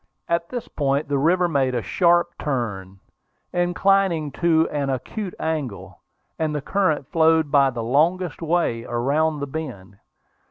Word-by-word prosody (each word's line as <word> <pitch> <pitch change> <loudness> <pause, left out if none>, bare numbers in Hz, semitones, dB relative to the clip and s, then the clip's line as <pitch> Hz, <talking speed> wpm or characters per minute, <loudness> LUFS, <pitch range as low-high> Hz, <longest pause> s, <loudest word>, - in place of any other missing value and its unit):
At 170 0 -1
this 245 -2 -5
point 140 0 -1
the 140 -1 +1
river 175 +5 +3
made 135 -5 0
a 120 - -1
sharp 175 -1 +3
turn, 100 -9 -3 0.5
inclining 175 -3 +2
to 165 +1 +2
an 145 -2 -2
acute 180 - -4
angle; 150 -9 -4 0.4
and 155 -1 -1
the - - 0
current 155 -5 0
flowed 160 -2 +3
by 140 -2 +5
the 120 -3 -4
longest 160 +7 +1
way 160 -8 0
around 145 +6 0
the - - -1
bend. 125 -10 -7
150 Hz, 145 wpm, -23 LUFS, 135-170 Hz, 0.5 s, by